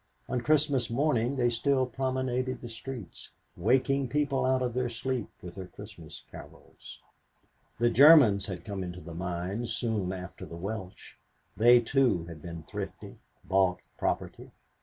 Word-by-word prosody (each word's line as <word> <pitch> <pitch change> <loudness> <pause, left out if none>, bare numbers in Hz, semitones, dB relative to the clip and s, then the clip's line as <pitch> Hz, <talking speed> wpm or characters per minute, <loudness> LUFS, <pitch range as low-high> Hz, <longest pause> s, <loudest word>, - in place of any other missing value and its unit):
On 125 - -1
Christmas 145 -3 +2
morning 125 0 +1
they 120 -2 +2
still 130 +2 +2
promenaded 130 0 -2
the 120 - -8
streets, 115 -3 -8 0.3
waking 135 +1 +2
people 140 -1 0
out 130 0 +2
of 125 -2 -1
their 125 0 0
sleep 120 0 -3
with 90 -1 -8
their 95 -1 -8
Christmas 100 -6 -11
carols. - - -12 0.8
The 120 0 +2
Germans 130 -8 +7
had 95 -2 -6
come 100 -2 -4
into 90 0 -6
the 85 -1 -9
mines 90 +7 -3
soon 110 -6 -1
after 90 -1 -7
the 85 - -8
Welsh. 95 0 -7 0.4
They 120 +2 +6
too 120 -8 +2
had 85 -2 -10
been 85 -1 -7
thrifty - - -7 0.3
bought 95 -1 +3 0.2
property. - - -2
120 Hz, 145 wpm, -29 LUFS, 95-130 Hz, 0.8 s, Germans